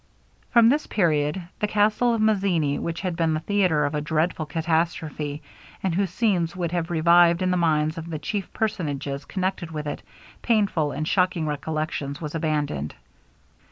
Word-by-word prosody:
From 235 Hz, -1 st, +6 dB
this 295 Hz, +4 st, +1 dB
period 165 Hz, -1 st, +1 dB
the 210 Hz, -, +1 dB
castle 215 Hz, +3 st, +2 dB
of 225 Hz, -, -1 dB
Mazzini, 190 Hz, -9 st, +2 dB
which 165 Hz, -1 st, -3 dB
had 185 Hz, -3 st, -2 dB
been 165 Hz, -2 st, +1 dB
the -, -, -1 dB
theatre 175 Hz, -4 st, +2 dB
of 145 Hz, -, -2 dB
a 150 Hz, -, -1 dB
dreadful 155 Hz, +1 st, -1 dB
catastrophe; 160 Hz, -2 st, -1 dB, 0.4 s
and 190 Hz, -3 st, 0 dB
whose 195 Hz, +2 st, +1 dB
scenes 185 Hz, -7 st, 0 dB
would 175 Hz, -3 st, -2 dB
have 170 Hz, -1 st, -1 dB
revived 170 Hz, +1 st, +5 dB
in 185 Hz, -, +1 dB
the -, -, +2 dB
minds 155 Hz, -2 st, +1 dB
of 165 Hz, +1 st, -8 dB
the 160 Hz, -, -3 dB
chief 195 Hz, +6 st, -4 dB
personages 145 Hz, -9 st, -3 dB
connected 185 Hz, -3 st, -2 dB
with 155 Hz, -2 st, -5 dB
it, 145 Hz, -, -4 dB, 0.4 s
painful 200 Hz, -10 st, +1 dB
and 155 Hz, +3 st, -3 dB
shocking 180 Hz, -3 st, +1 dB
reflections 150 Hz, 0 st, -3 dB
was 150 Hz, -3 st, -5 dB
abandoned. 150 Hz, -, -2 dB
165 Hz, 165 wpm, -24 LUFS, 150-185 Hz, 0.4 s, From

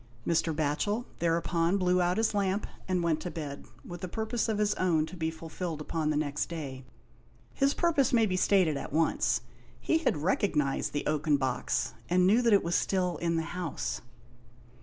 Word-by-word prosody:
Mr. 165 Hz, 0 st, +1 dB
Batchel 160 Hz, +10 st, -1 dB
thereupon 170 Hz, +2 st, +1 dB
blew 180 Hz, -1 st, +2 dB
out 175 Hz, +2 st, +1 dB
his 220 Hz, -1 st, +2 dB
lamp 200 Hz, 0 st, 0 dB, 0.2 s
and 180 Hz, -2 st, 0 dB
went 165 Hz, -2 st, +1 dB
to 180 Hz, -, -4 dB
bed, 145 Hz, -4 st, -6 dB, 0.2 s
with 175 Hz, +2 st, -8 dB
a -, -, -2 dB
purpose 220 Hz, +4 st, -2 dB
of 215 Hz, -, 0 dB
his 210 Hz, 0 st, +2 dB
own 165 Hz, -4 st, +1 dB
to 185 Hz, -, -10 dB
be 160 Hz, -2 st, -1 dB
fulfilled 160 Hz, 0 st, -5 dB
upon 155 Hz, 0 st, -2 dB
the 150 Hz, -, +1 dB
next 150 Hz, -1 st, -1 dB
day. 140 Hz, -6 st, -6 dB, 0.7 s
His 275 Hz, 0 st, +2 dB
purpose 315 Hz, -7 st, +2 dB
may 230 Hz, -2 st, +4 dB
be 185 Hz, -3 st, -1 dB
stated 185 Hz, -5 st, +3 dB
at -, -, -6 dB
once. 160 Hz, +3 st, +1 dB, 0.4 s
He 325 Hz, -, +1 dB
had 320 Hz, -, +1 dB
recognised 150 Hz, -4 st, 0 dB
the 145 Hz, -, -2 dB
oaken 150 Hz, -1 st, +2 dB
box, 130 Hz, -3 st, -1 dB, 0.2 s
and 180 Hz, +1 st, +4 dB
knew 215 Hz, +6 st, +5 dB
that 235 Hz, -2 st, +3 dB
it 200 Hz, -, +5 dB
was 170 Hz, -, -2 dB
still 180 Hz, -4 st, +1 dB
in 170 Hz, +1 st, 0 dB
the 165 Hz, -, 0 dB
house. 175 Hz, -4 st, -3 dB
170 Hz, 185 wpm, -29 LUFS, 155-200 Hz, 0.7 s, knew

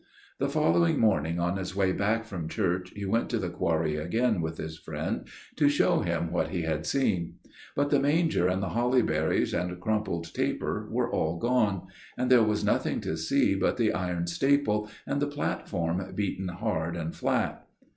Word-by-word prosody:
"The -, -, +1 dB
following 85 Hz, 0 st, +3 dB
morning 85 Hz, -6 st, +2 dB
on 85 Hz, +2 st, 0 dB
his 95 Hz, -1 st, -5 dB
way 95 Hz, -1 st, +2 dB
back 110 Hz, +4 st, 0 dB
from 85 Hz, -7 st, -5 dB
church 90 Hz, +2 st, -1 dB
he 100 Hz, -1 st, -4 dB
went 115 Hz, +4 st, 0 dB
to 120 Hz, -, 0 dB
the 90 Hz, -5 st, -2 dB
quarry 80 Hz, -3 st, 0 dB
again 110 Hz, +6 st, +1 dB
with 80 Hz, 0 st, -3 dB
his 80 Hz, 0 st, -5 dB
friend -, -, -4 dB, 0.3 s
to 145 Hz, -2 st, +5 dB
show 145 Hz, -, +3 dB
him 85 Hz, -2 st, -1 dB
what 85 Hz, -, +1 dB
he 90 Hz, -3 st, -2 dB
had 80 Hz, -1 st, -2 dB
seen; 90 Hz, -, 0 dB, 0.4 s
but 145 Hz, 0 st, +1 dB
the 145 Hz, -, +5 dB
manger 150 Hz, -, +2 dB
and 95 Hz, +2 st, 0 dB
the 95 Hz, -, -1 dB
holly 125 Hz, +4 st, +2 dB
berries 80 Hz, 0 st, +1 dB
and 90 Hz, 0 st, -2 dB
crumpled 90 Hz, -5 st, -2 dB
taper -, -, -1 dB
were -, -, 0 dB
all 80 Hz, +1 st, 0 dB
gone, 110 Hz, -4 st, +1 dB, 0.3 s
and 125 Hz, +1 st, 0 dB
there 125 Hz, -2 st, +8 dB
was 105 Hz, -1 st, +1 dB
nothing -, -, +1 dB
to -, -, -2 dB
see -, -, +2 dB
but -, -, +1 dB
the -, -, +2 dB
iron 90 Hz, -2 st, -1 dB
staple 105 Hz, +1 st, +1 dB, 0.2 s
and 140 Hz, -, -1 dB
the 145 Hz, -, +2 dB
platform 95 Hz, -, -2 dB
beaten 95 Hz, -2 st, -2 dB
hard 90 Hz, -3 st, -2 dB
and 80 Hz, -1 st, -4 dB
flat." -, -, -1 dB
95 Hz, 185 wpm, -28 LUFS, 85-115 Hz, 0.4 s, there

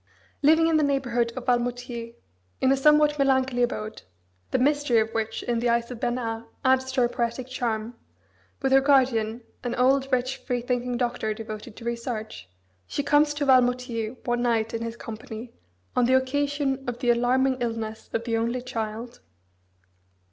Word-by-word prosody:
Living 320 Hz, +3 st, +5 dB
in 325 Hz, -1 st, +3 dB
the 305 Hz, -, +3 dB
neighbourhood 245 Hz, -4 st, +1 dB
of 255 Hz, -, -5 dB
Valmoutiers, 245 Hz, -1 st, -2 dB, 0.4 s
in 260 Hz, -, +3 dB
a -, -, +5 dB
somewhat 300 Hz, +1 st, +4 dB
melancholy 265 Hz, -2 st, +2 dB
abode 220 Hz, -3 st, -2 dB, 0.5 s
(the -, -, +1 dB
mystery 290 Hz, -2 st, +2 dB
of 220 Hz, 0 st, 0 dB
which 225 Hz, 0 st, -2 dB
in 240 Hz, -1 st, 0 dB
the 240 Hz, +1 st, +1 dB
eyes 235 Hz, +1 st, +1 dB
of 245 Hz, -, -7 dB
Bernard 230 Hz, -2 st, -2 dB, 0.2 s
adds 260 Hz, 0 st, +3 dB
to 260 Hz, -, +1 dB
her 240 Hz, -, +4 dB
poetic 235 Hz, +1 st, -2 dB
charm) 235 Hz, -3 st, -2 dB, 0.7 s
with 270 Hz, -, +2 dB
her 270 Hz, 0 st, +6 dB
guardian, 250 Hz, -5 st, +2 dB, 0.2 s
an 245 Hz, -1 st, -2 dB
old, 270 Hz, +2 st, +2 dB
rich, 255 Hz, +1 st, 0 dB
freethinking 245 Hz, -1 st, -2 dB
doctor, 240 Hz, -3 st, -1 dB
devoted 215 Hz, -1 st, -8 dB
to 230 Hz, -, -11 dB
research, 230 Hz, -, -4 dB, 0.4 s
she 285 Hz, -, -2 dB
comes 295 Hz, +1 st, +4 dB
to 290 Hz, -1 st, -1 dB
Valmoutiers 250 Hz, -3 st, +2 dB
one 240 Hz, 0 st, 0 dB
night 225 Hz, -2 st, +1 dB
in 230 Hz, -, -2 dB
his 230 Hz, 0 st, -4 dB
company 225 Hz, +1 st, -8 dB, 0.4 s
on 250 Hz, -, +4 dB
the 260 Hz, +2 st, +4 dB
occasion 280 Hz, 0 st, -1 dB
of 240 Hz, -, -4 dB
the 245 Hz, -1 st, +2 dB
alarming 255 Hz, +2 st, +2 dB
illness 225 Hz, -2 st, -4 dB
of 230 Hz, -, -1 dB
the 230 Hz, -1 st, -1 dB
only 235 Hz, +2 st, -1 dB
child. 230 Hz, 0 st, -5 dB
245 Hz, 165 wpm, -26 LUFS, 230-265 Hz, 0.7 s, her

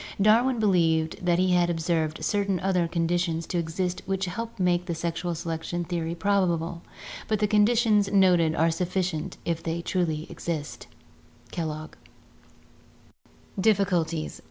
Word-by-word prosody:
"Darwin 235 Hz, +5 st, +4 dB
believed 165 Hz, -6 st, +1 dB
that 175 Hz, -1 st, +2 dB
he 185 Hz, 0 st, +2 dB
had 175 Hz, -1 st, +3 dB
observed 165 Hz, -2 st, -1 dB
certain 200 Hz, -3 st, 0 dB
other 180 Hz, -3 st, +1 dB
conditions 170 Hz, 0 st, 0 dB
to 175 Hz, -, -2 dB
exist 175 Hz, +2 st, -2 dB
which 195 Hz, 0 st, -1 dB
helped 225 Hz, +5 st, -6 dB
make 180 Hz, -1 st, +1 dB
the 170 Hz, -, -2 dB
sexual 170 Hz, +1 st, -3 dB
selection 165 Hz, +1 st, -3 dB
theory 170 Hz, -1 st, -3 dB
probable, 170 Hz, -3 st, 0 dB, 0.5 s
but 215 Hz, -, +1 dB
the 210 Hz, -, +1 dB
conditions 210 Hz, -1 st, +3 dB
noted 180 Hz, -5 st, +4 dB
are 165 Hz, +1 st, +3 dB
sufficient 180 Hz, -1 st, -2 dB
if 165 Hz, -1 st, -1 dB
they 165 Hz, 0 st, -3 dB
truly 170 Hz, -3 st, -1 dB
exist" 155 Hz, -4 st, -5 dB, 0.6 s
(Kellogg). 155 Hz, -2 st, -4 dB, 1.7 s
Difficulties. 180 Hz, -6 st, +1 dB
175 Hz, 130 wpm, -26 LUFS, 165-195 Hz, 1.7 s, Darwin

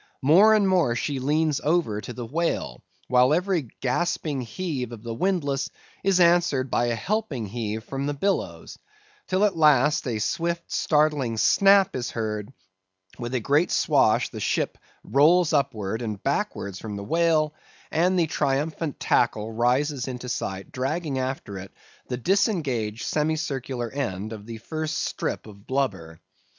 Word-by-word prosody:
More 195 Hz, +10 st, +7 dB
and 205 Hz, -2 st, +3 dB
more 170 Hz, -11 st, +2 dB
she 135 Hz, +2 st, -2 dB
leans 150 Hz, +2 st, +1 dB
over 150 Hz, -10 st, +1 dB
to 95 Hz, -, -7 dB
the 120 Hz, -, -6 dB
whale, 130 Hz, -, -2 dB, 0.3 s
while 125 Hz, +3 st, +4 dB
every 180 Hz, -5 st, 0 dB
gasping 145 Hz, +1 st, -1 dB
heave 125 Hz, 0 st, -4 dB
of 115 Hz, -2 st, -9 dB
the 115 Hz, -1 st, -4 dB
windlass 145 Hz, -2 st, 0 dB, 0.3 s
is 195 Hz, -2 st, +3 dB
answered 170 Hz, -7 st, +3 dB
by 120 Hz, -, +2 dB
a 120 Hz, -, 0 dB
helping 175 Hz, -, -2 dB
heave 110 Hz, 0 st, -4 dB
from 135 Hz, +3 st, -4 dB
the 145 Hz, -, -2 dB
billows; 195 Hz, +7 st, -2 dB, 0.5 s
till 190 Hz, +2 st, +2 dB
at 205 Hz, -, +1 dB
last, 150 Hz, -3 st, +4 dB
a 115 Hz, -3 st, -1 dB
swift, 170 Hz, -, -2 dB
startling 150 Hz, -6 st, +1 dB
snap 195 Hz, -, +5 dB
is 125 Hz, -1 st, -2 dB
heard; 105 Hz, 0 st, -4 dB, 0.7 s
with 120 Hz, +1 st, -4 dB
a -, -, +2 dB
great 145 Hz, +8 st, +2 dB
swash -, -, +3 dB
the -, -, -8 dB
ship -, -, -1 dB, 0.2 s
rolls 160 Hz, +4 st, +4 dB
upwards 115 Hz, -6 st, 0 dB
and 105 Hz, -4 st, -5 dB
backwards 100 Hz, -1 st, -2 dB
from 105 Hz, -2 st, -6 dB
the 100 Hz, -, -5 dB
whale, 160 Hz, +2 st, +2 dB, 0.4 s
and 180 Hz, +3 st, +2 dB
the 170 Hz, -, +3 dB
triumphant 150 Hz, +1 st, -1 dB
tackle 110 Hz, -2 st, +1 dB
rises 125 Hz, +4 st, +1 dB
into 125 Hz, -1 st, -6 dB
sight 95 Hz, -5 st, -4 dB
dragging 140 Hz, +2 st, -2 dB
after 130 Hz, -7 st, -4 dB
it 95 Hz, +1 st, -10 dB, 0.4 s
the 125 Hz, -, -3 dB
disengaged 130 Hz, -, 0 dB
semicircular 140 Hz, -6 st, -2 dB
end 110 Hz, -6 st, -3 dB
of 105 Hz, -1 st, -10 dB
the 115 Hz, -1 st, -6 dB
first 155 Hz, +7 st, -4 dB
strip -, -, -3 dB
of 100 Hz, -2 st, -14 dB
blubber. 95 Hz, -12 st, -2 dB
135 Hz, 150 wpm, -25 LUFS, 115-160 Hz, 0.7 s, More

